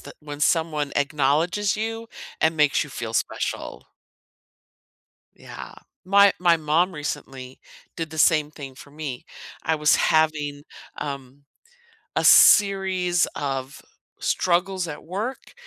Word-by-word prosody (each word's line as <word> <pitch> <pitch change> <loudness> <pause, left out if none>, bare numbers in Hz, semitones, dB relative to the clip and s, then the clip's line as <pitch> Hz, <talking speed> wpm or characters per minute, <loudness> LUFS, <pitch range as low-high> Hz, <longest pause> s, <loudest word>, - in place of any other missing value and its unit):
that - - -12
when 145 -1 -8
someone 155 -2 0
acknowledges 150 +8 +1
you 225 +1 -4 0.3
and 160 0 +2
makes 150 -1 +2
you 145 - -12
feel 115 -2 -6
special. - - -3 1.5
Yeah, - - -10 0.3
my 200 +1 +5
my 175 -2 +4
mom 160 +4 +1
recently 135 -4 -6 0.4
did 165 -2 -4
the 160 - -8
same 155 -1 +3
thing 140 -3 -10
for 145 - -14
me, 145 -4 -7 0.4
I 160 - 0
was 150 0 +3
having, 150 -2 +1 0.4
um, 140 -1 -7 0.7
a - - +1
series 190 -3 +5
of 135 -1 -4 0.4
struggles 180 0 0
at 150 - -8
work, 210 +10 -5
155 Hz, 120 wpm, -23 LUFS, 145-180 Hz, 1.5 s, my